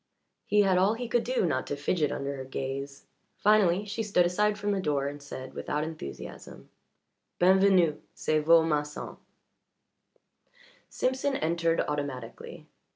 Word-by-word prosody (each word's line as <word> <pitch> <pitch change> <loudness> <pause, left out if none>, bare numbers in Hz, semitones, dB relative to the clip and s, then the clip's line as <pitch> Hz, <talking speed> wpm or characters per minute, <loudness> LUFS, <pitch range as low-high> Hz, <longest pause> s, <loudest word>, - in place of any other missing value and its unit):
He 210 - +4
had 190 -2 +3
all 200 +4 +3
he 245 +1 -5
could 240 0 +1
do 250 -5 0
not 130 -6 -1
to 145 - -2
fidget 150 +1 0
under 140 0 -3
her 135 - -6
gaze; 135 +1 -5 0.3
finally, 205 -2 +3
she 205 +2 -4
stood 200 -5 +2
aside 210 +4 +1
from 205 0 -1
the 200 - 0
door 145 -4 0
and 145 0 -6
said, 130 -2 -8
without 150 +1 -2
enthusiasm: 155 - -8 0.7
"B'en 185 +2 +5
venu. 185 -6 +3
C'est 155 0 +1
vo' 165 +1 +6
masson." 150 -2 -3 1.7
Simpson 265 +2 -1
entered 165 -3 +1
automatically. 140 -5 -5
165 Hz, 145 wpm, -28 LUFS, 145-200 Hz, 1.7 s, vo